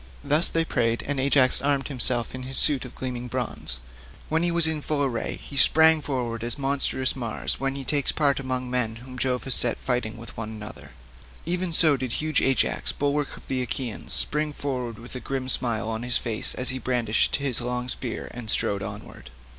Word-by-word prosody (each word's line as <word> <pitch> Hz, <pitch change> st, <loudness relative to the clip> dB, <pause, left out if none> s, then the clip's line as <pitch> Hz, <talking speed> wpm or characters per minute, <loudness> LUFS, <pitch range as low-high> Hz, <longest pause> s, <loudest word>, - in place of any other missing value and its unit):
Thus 150 Hz, +4 st, +2 dB
they 165 Hz, 0 st, 0 dB
prayed, 115 Hz, -6 st, 0 dB
and 145 Hz, -1 st, -2 dB
Ajax 135 Hz, -1 st, +3 dB
armed 140 Hz, -1 st, 0 dB
himself 125 Hz, -4 st, 0 dB
in 130 Hz, -, -6 dB
his 130 Hz, +1 st, -2 dB
suit 140 Hz, -3 st, +4 dB
of 125 Hz, -, -11 dB
gleaming 125 Hz, -1 st, -5 dB
bronze. 120 Hz, -, -3 dB, 0.5 s
When 160 Hz, +1 st, +3 dB
he 175 Hz, -, +3 dB
was 170 Hz, -1 st, +3 dB
in 160 Hz, -1 st, 0 dB
full 145 Hz, -1 st, -1 dB
array 120 Hz, -4 st, -2 dB
he 140 Hz, -, -11 dB
sprang 160 Hz, +3 st, +7 dB
forward 120 Hz, -5 st, -3 dB
as 120 Hz, -1 st, -2 dB
monstrous 135 Hz, -1 st, 0 dB
Mars 120 Hz, -4 st, -3 dB
when 135 Hz, 0 st, -1 dB
he 140 Hz, -, -5 dB
takes 145 Hz, 0 st, +2 dB
part 140 Hz, -3 st, +1 dB
among 130 Hz, -1 st, -3 dB
men 125 Hz, -3 st, 0 dB
whom 125 Hz, +2 st, -10 dB
Jove 125 Hz, -1 st, -1 dB
has 130 Hz, -, +1 dB
set 120 Hz, -1 st, +3 dB
fighting 125 Hz, -3 st, -2 dB
with 115 Hz, -1 st, -11 dB
one 110 Hz, -1 st, -5 dB
another—even 105 Hz, -, -6 dB
so 160 Hz, -3 st, +4 dB
did 130 Hz, -2 st, -4 dB
huge 155 Hz, -1 st, +1 dB
Ajax, 135 Hz, -1 st, 0 dB
bulwark 145 Hz, 0 st, -2 dB
of -, -, -16 dB
the 130 Hz, -1 st, -2 dB
Achaeans, 125 Hz, -2 st, -4 dB
spring 150 Hz, 0 st, +5 dB
forward 125 Hz, -6 st, -4 dB
with 120 Hz, +1 st, -11 dB
a 130 Hz, -, -5 dB
grim 130 Hz, +1 st, -4 dB
smile 120 Hz, -4 st, 0 dB
on 110 Hz, 0 st, -3 dB
his 125 Hz, 0 st, +1 dB
face 110 Hz, -2 st, +2 dB
as 125 Hz, -, +4 dB
he 130 Hz, 0 st, -1 dB
brandished 120 Hz, -4 st, 0 dB
his 140 Hz, -4 st, -2 dB
long 125 Hz, 0 st, -3 dB
spear 125 Hz, -2 st, -5 dB
and 120 Hz, -3 st, -7 dB
strode 100 Hz, -1 st, +1 dB
onward. 65 Hz, -8 st, -9 dB
130 Hz, 200 wpm, -25 LUFS, 120-140 Hz, 0.5 s, sprang